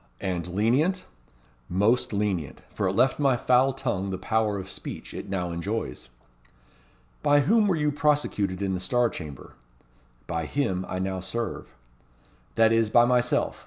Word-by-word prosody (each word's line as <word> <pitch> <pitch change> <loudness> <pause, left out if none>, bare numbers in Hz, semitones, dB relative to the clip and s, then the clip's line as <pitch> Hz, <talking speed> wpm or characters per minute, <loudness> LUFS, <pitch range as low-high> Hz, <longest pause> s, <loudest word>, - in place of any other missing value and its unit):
"And 90 -2 -3
lenient?" 125 - +1 0.6
"Most 105 +7 +2
lenient. 95 -10 -2
For 100 - -1
it 95 - 0
left 130 +7 +2
my 135 -4 +3
foul 130 +2 +3
tongue 120 -8 -2
the 95 - -3
power 105 +1 0
of 95 -1 -6
speech - - -7
it - - -7
now 90 -3 -2
enjoys." 95 - -4 1.1
"By 145 -1 +4
whom 215 - +3
were 190 - +2
you 150 -2 +1
prosecuted 145 - 0
in 95 -1 0
the 90 - -2
Star 120 +5 +1
Chamber?" 75 -5 -9 0.7
"By 80 -3 -3
him 95 - -1
I - - -3
now 95 0 -2
serve." 95 - -5 0.8
"That 115 0 +5
is, 115 -1 +3
by 120 +2 +6
myself. 125 0 +1
105 Hz, 155 wpm, -26 LUFS, 95-130 Hz, 1.1 s, by